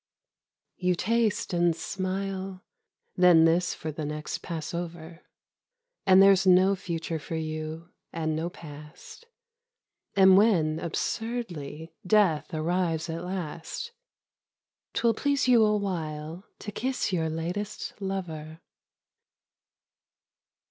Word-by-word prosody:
You 180 -1 +1
taste 225 +2 0
and 175 -1 +3
smile, 190 +1 -4 0.5
then 175 -3 +6
this 175 +2 +2
for 160 - -5
the 155 +1 -5
next 150 +1 -4
pass 165 -2 -5
over; 170 -1 -6 0.9
And 190 0 +8
there's 195 -1 +5
no 185 +2 +6
future 165 -3 -4
for 165 +2 -6
you 155 +1 -5 0.2
and 160 -1 -2
no 165 +2 -2
past, 150 - -12 0.9
And 190 -1 +7
when, 165 -8 +3
absurdly, 170 -5 -4
death 185 -6 +3
arrives 165 0 -1
at 165 +1 -5
last, 180 - -5 1.0
'Twill 235 -1 +3
please 280 +3 0
you 240 -3 +6
awhile 175 -5 -2
to 205 - -7
kiss 255 -2 -2
your 160 -2 0
latest 175 +6 -4
lover. 165 -5 -5
175 Hz, 105 wpm, -27 LUFS, 160-195 Hz, 1.0 s, And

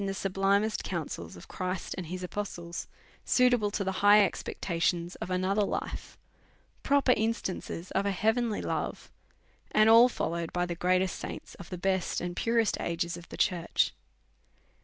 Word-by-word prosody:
99 200 - -2
the 195 - -1
sublimest 195 +3 +1
counsels 145 - -5
of - - -12
Christ 185 0 -4
and 180 -3 -5
his 180 +2 -5
apostles, 175 -3 -5 0.4
suit 250 -1 +4
able 215 -4 +2
to 205 0 -2
the 190 - -1
high 205 0 +7
expectations 170 -2 -2
of - - -6
another 185 +3 +1
life, 200 - -3 0.6
pro 285 -1 +3
per 255 - +5
instances 200 -5 -3
of 200 +1 0
a - - +2
heavenly 220 +3 0
love, - - -3 0.6
and 215 0 +4
ail 230 +3 +8
followed 170 -7 -3
by 175 0 0
the 175 - -3
greatest 185 +2 +1
saints - - -7
of 185 -4 -11
the 180 - -5
best 190 0 0
and 175 0 -4
purest 230 0 +1
ages 170 0 -2
of 175 0 -11
the - - -8
church. 175 -3 +1
190 Hz, 165 wpm, -29 LUFS, 175-210 Hz, 0.6 s, ail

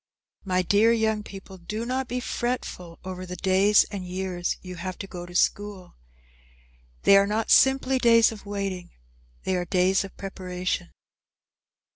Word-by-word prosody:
My 185 -1 +1
dear 205 +5 +4
young 220 -2 +1
people, 195 -2 -11
do 215 +6 -5
not 260 +1 -2
be 250 +1 -2
fretful 240 -9 -4
over 185 -1 -6
the 180 0 -6
days 190 +3 +4
and 200 -3 -5
years 180 -1 -3
you 180 -1 -8
have 185 +1 -5
to - - -6
go 175 -2 -8
to 175 - -12
school. 200 0 -1 1.1
They 200 - +7
are 200 0 +4
not 215 +2 -1
simply 265 -1 +4
days 230 -2 +5
of 215 -2 -10
waiting, 195 -3 -4 0.5
they 190 - 0
are 180 - 0
days 185 +2 +2
of 195 - -11
preparation. 185 -2 -4
195 Hz, 155 wpm, -25 LUFS, 180-220 Hz, 1.1 s, They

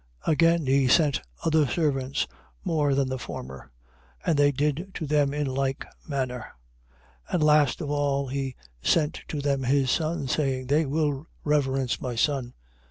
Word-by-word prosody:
Again 165 0 +3
he 135 0 +3
sent 145 0 +3 0.2
other 155 -2 +3
servants, 135 -3 0 0.4
more 150 -4 +2
than 135 -1 +1
the 130 0 -3
former; 65 - -8 0.6
and 165 - +2
they 145 0 +4
did 150 +6 -1
to 160 - -3
them 145 -1 +2
in 145 0 -1
like 135 0 -1 0.2
manner. 130 -4 -2 0.9
21:37. - - -10
And 165 - +2
last 150 -1 +4
of 145 -2 -3
all 140 -1 0
he 135 -1 -3 0.3
sent 150 - +1
to 150 - -3
them 140 -1 0
his 135 0 +2
son, 160 -3 -1
saying: 130 -1 0
They 145 +3 +2
will 145 0 -1 0.2
reverence 135 -4 +1
my 125 -2 -3
son. 135 +2 +1
21:38. 120 - -14
140 Hz, 165 wpm, -26 LUFS, 135-150 Hz, 0.9 s, they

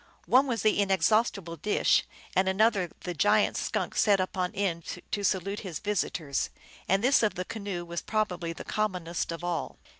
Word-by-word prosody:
One 265 +3 +5
was 235 -3 -1
the 215 -1 +3
inexhaustible 195 -2 +1
dish, 210 +7 +2 0.3
and 190 0 +3
another 200 -2 +2
the 180 - -4
giant 205 +5 +3
skunk - - -2
set 200 -2 +4
upon 185 -1 -1
end 180 -3 -2
to 205 - -1
salute 195 +1 0
his 180 -7 -5
vis 210 +3 0
itors, 145 -5 -3 0.4
and 195 +3 +3
this 270 +2 +5
of 215 -2 +1
the 180 - -3
canoe 200 -5 -5
was 170 0 -4
probably 180 -6 -1
the 165 - -7
commonest 180 -6 -2
of 165 +1 -6
all. 175 -1 -3
190 Hz, 175 wpm, -28 LUFS, 175-210 Hz, 0.4 s, One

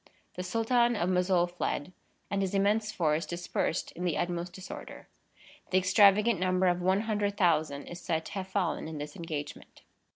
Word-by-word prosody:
The - - -5
Sultan 235 +5 +2
of 180 -3 0
Mossoul 180 -1 +3
fled, 175 -1 -3 0.4
and 200 -1 0
his 195 0 -1
immense 210 +2 +2
force 155 -3 +1
dispersed 170 0 -2
in 180 - -7
the 175 -3 0
utmost 175 0 -2
disorder. 190 +1 -9 0.6
The 185 - +3
extravagant 200 +2 +5
number 185 0 +2
of 180 0 +2
100,000 190 -7 +1
is 175 +1 -9
said 160 -2 -1
to - - -8
have 190 -2 -4
fallen 190 -4 -1
in 160 -1 -6
this 145 0 -6
engagement. 155 -4 -7
180 Hz, 160 wpm, -30 LUFS, 170-200 Hz, 0.6 s, extravagant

